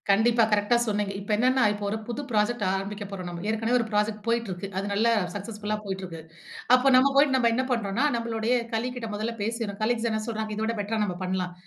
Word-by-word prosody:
கண்டிப்பா. 230 +4 +4
கரெக்ட்டா 210 +3 +3
சொன்னிங்க. 205 -2 -1
இப்போ 200 +2 -6
என்னென்னா 255 +4 +3
இப்போ 205 0 -7
ஒரு 215 - -1
புது 240 +3 -3
ப்ராஜெக்ட் 220 +1 +1
ஆரம்பிக்க 200 +2 -4
போறோம் 185 -3 -6
நம்ம. 170 -1 -6
ஏற்கனவே 225 +2 +1
ஒரு 230 - 0
ப்ராஜெக்ட் 210 0 0
போயிட்டு 230 -2 0
இருக்கு 180 +2 -5
அது 195 - -1
நல்லா 225 +3 +3 0.2
சக்சஸ்ஃபுல்லா 210 +1 -4
போய்ட்டிருக்கு. 190 -4 -5 0.5
அப்போ 255 +2 +4
நம்ம 265 +2 +5
போயிட்டு 280 -1 +5
நம்ம 235 -3 +3
என்ன 260 +2 +1
பண்ணுறோம்ன்னா 230 +1 0
நம்மளுடைய 230 0 -1 0.2
கலீக்கிட்ட 245 0 -3
முதல்ல 220 +3 -3
பேசிறோம் 220 -2 -3
கலீக்ஸ் 235 +1 +1
என்ன 220 - 0
சொல்றாங்க 220 -2 -3
இத 215 - -2
விட 230 +1 -1
பெட்டரா 215 +2 -1
நம்ம 180 -3 -3
பண்ணலாம். 185 -1 -2
220 Hz, 200 wpm, -26 LUFS, 205-235 Hz, 0.5 s, நம்ம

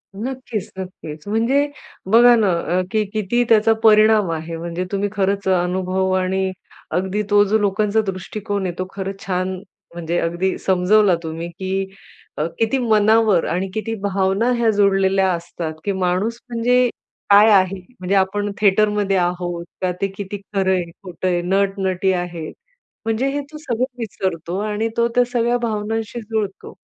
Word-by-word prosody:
नक्कीच, 240 -2 -5
नक्कीच. 160 -3 -8
म्हणजे 235 +7 +2 0.4
बघा 240 +2 +7
ना 215 -4 +2 0.3
अ, - - +3
की 215 -1 +2
किती 215 +3 +1
त्याचा 225 0 +5
परिणाम 215 -2 +5
आहे. 165 +1 -4
म्हणजे 170 +2 -4
तुम्ही 200 0 -1
खरंच 200 -1 -1
अनुभव 185 +1 +1
आणि 190 +1 0 0.5
अगदी 190 +3 -1
तो 205 0 +6
जो 205 +2 +2
लोकांचा 210 +1 +1
दृष्टिकोन 200 +1 -3
आहे 180 - -2
तो 185 - -1
खरंच 195 0 -5
छान! 185 0 -1 0.4
म्हणजे 170 0 -2
अगदी 175 +3 -1
समजवला 190 +1 +3
तुम्ही, 165 +1 -5
की 190 +2 -3 0.5
अ, 150 - 0
किती 225 +4 +2
मनावर 220 -4 +3
आणि 185 +3 -1
किती 220 +1 -3
भावना 200 +3 +1
ह्या 235 -1 +2
जोडलेल्या 195 -2 +3
असतात, 170 -2 -4
की 200 - 0
माणूस 190 +5 -1
म्हणजे 245 +2 +3 0.4
काय 205 +2 +7
आहे? 190 -1 +3 0.2
म्हणजे 185 +2 0
आपण 205 +2 +1
थिएटरमध्ये 205 -1 +3
आहोत 175 -1 -2 0.2
का 185 -1 +1
ते 195 - +2
किती 200 0 -5 0.2
खरं 190 -1 +2
आहे 180 -2 0
खोटं 185 -1 -4
आहे 175 -1 +1
नट-नटी 190 0 0
आहेत. 175 -3 -4 0.5
म्हणजे 225 +4 0
हे 285 +1 -2
तो 305 - -8
सगळं 255 -5 -1
विसरतो 185 -6 -3
आणि 215 +1 -1
तो 235 0 +3
त्या 245 - +5
सगळ्या 240 0 +2
भावनांशी 225 0 -3
जुळतो. 215 -3 -4
195 Hz, 150 wpm, -20 LUFS, 185-220 Hz, 0.5 s, बघा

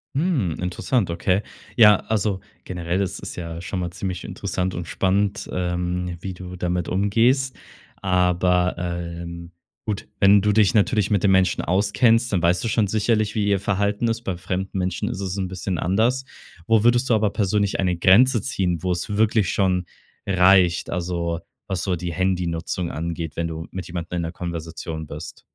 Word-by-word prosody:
Hm, 135 - 0
interessant, 95 +4 0
okay. 90 +3 +1 0.3
Ja, 105 -3 +8
also 105 -3 0 0.3
generell 90 +1 -2
ist 95 - -3
es - - -6
ja 85 -1 -6
schon 95 0 -4
mal 90 - -2
ziemlich 90 0 -5
interessant 90 0 -3
und 85 - -4
spannend, 100 +1 0
ähm, 90 0 -2
wie 95 0 -5
du 90 0 -8
damit 90 -1 -2
umgehst. 120 +7 +2 0.4
Aber, 90 -1 +2
ähm, 85 -1 -5 0.4
gut, 105 -1 -3
wenn 100 0 +6
du 105 - +3
dich 105 +1 +3
natürlich 105 -1 +2
mit 105 -3 +1
dem 100 - +4
Menschen 95 -1 +3
auskennst, 115 +6 +2
dann 90 -3 0
weißt 85 +1 +3
du - - -1
schon 110 0 +2
sicherlich, 110 +1 +1
wie 105 -2 0
ihr 100 -1 +2
Verhalten 100 +3 0
ist. 115 0 -1
Bei 95 -6 -3
fremden 95 +2 -3
Menschen 90 0 -1
ist - - -5
es 95 -1 -3
'n 95 - -1
bisschen 90 -1 -3
anders. 115 +9 +1 0.4
Wo 110 -2 +4
würdest 120 +2 +3
du 115 - +5
aber 105 -1 +1
persönlich 100 0 0
eine 90 -2 +1
Grenze 115 +8 +5
ziehen, 90 - -1
wo's 90 0 -1
wirklich 110 -4 +3
schon 95 -2 +1 0.4
reicht, 95 -2 +4
also, 85 -1 -2 0.3
was 95 -2 -2
so 95 -2 0
die 85 0 -4
Handynutzung 90 -1 -1
angeht, 80 -1 -4
wenn 85 0 -1
du 80 0 -6
mit 95 -2 -6
jemandem 85 0 -4
in - - 0
der 80 - -3
Konversation 80 -2 -6
bist? 75 +1 -8
95 Hz, 175 wpm, -23 LUFS, 85-105 Hz, 0.4 s, Ja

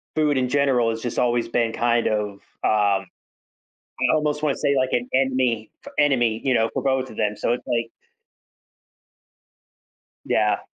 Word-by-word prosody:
food 150 -2 +2
in 125 -1 0
general 130 -4 +2
has 115 0 -3
just 120 -1 -3
always 120 -1 +1
been 115 -1 0
kind 120 0 +1
of, 105 -1 -1 0.3
um, 100 -2 +2 1.0
I - - +3
almost 150 -1 0
wanna 150 -3 +1
say 140 - +1
like 130 -1 +1
an 120 0 0
enemy, 130 -4 +1 0.2
f - - -10
enemy, 120 -6 +2
you 130 -2 +2
know, 115 -1 +2
for - - -1
both 130 -1 0
of 110 - -12
them, 105 0 0
so 105 - 0
it's 120 - -4
like 115 -2 -1 2.3
Yeah. - - +1
120 Hz, 160 wpm, -23 LUFS, 115-135 Hz, 2.3 s, I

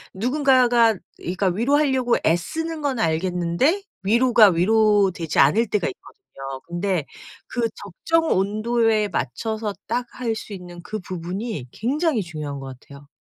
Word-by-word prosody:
누군가가 245 -2 +3 0.2
그러니까 185 +3 -3
위로하려고 260 +4 +2
애쓰는 315 - -1
건 275 -4 -1
알겠는데 180 - 0 0.2
위로가 230 +1 +5
위로 205 +2 +3
되지 165 -3 -4
않을 210 +12 +4
때가 210 - 0
있거든요. 135 - -10
근데 175 -2 -1 0.4
그 240 - -4
적정 325 - -1
온도에 215 +2 +1
맞춰서 210 - -3
딱 245 +2 -1
할 235 -3 -1
수 215 - -8
있는 175 -2 -9
그 215 +4 -5
부분이 185 - -5
굉장히 270 - 0
중요한 150 -4 -6
것 135 -2 -9
같아요. 140 0 -15
210 Hz, 300 characters per minute, -22 LUFS, 175-245 Hz, 0.4 s, 위로가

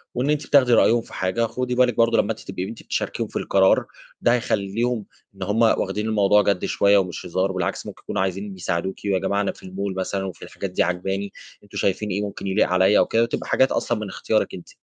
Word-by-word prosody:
وإن 130 +4 0
أنتِ 150 -1 0
بتاخدي 130 -4 +5
رأيهم 115 +1 +5
في - - -16
حاجة. 95 +5 0
خُدي 125 +2 -3
بالِك 125 -2 +3
برضو 115 0 +4
لمّا 110 - +2
أنتِ 110 - -5
تبقي 95 -1 -5
أنتِ 115 +4 -7
بتشاركيهم - - -2
في - - -4
القرار، 95 -1 +3 0.4
ده 120 - +4
هيخلّيهم 115 -1 -1 0.3
إن 95 - -6
هُم 105 +4 0
واخدين 105 -2 +2
الموضوع 105 -1 +4
جَد 100 -2 0
شوية 100 0 +3
ومش 90 -3 -2
هزار، 95 +2 0
بالعكس 95 -2 -3
ممكن - - -9
يكونوا - - -2
عايزين 95 +1 -3
يساعدوكِ 90 +1 -2
"ويا 95 -2 +1
جماعة 100 +2 0
أنا 100 - 0
في - - -16
الmall"، 95 +1 -4
مثلًا، 95 +1 -2
"وفي 95 - -8
الحاجات 100 - -6
دي - - +2
عاجباني 95 +3 -2 0.3
أنتم 100 0 -10
شايفين 100 +2 0
إيه 100 +2 -1
ممكن 100 -1 -5
يليق 95 - +2
عليّا 95 +3 +4
أو - - +4
كده؟" 115 +1 +2
وتبقى 115 - -3
حاجات 130 - +3
أصلًا 120 - 0
من 105 - -4
إختيارِك 110 +2 -1
أنتِ. 90 - -9
100 Hz, 225 wpm, -23 LUFS, 95-115 Hz, 0.4 s, بتاخدي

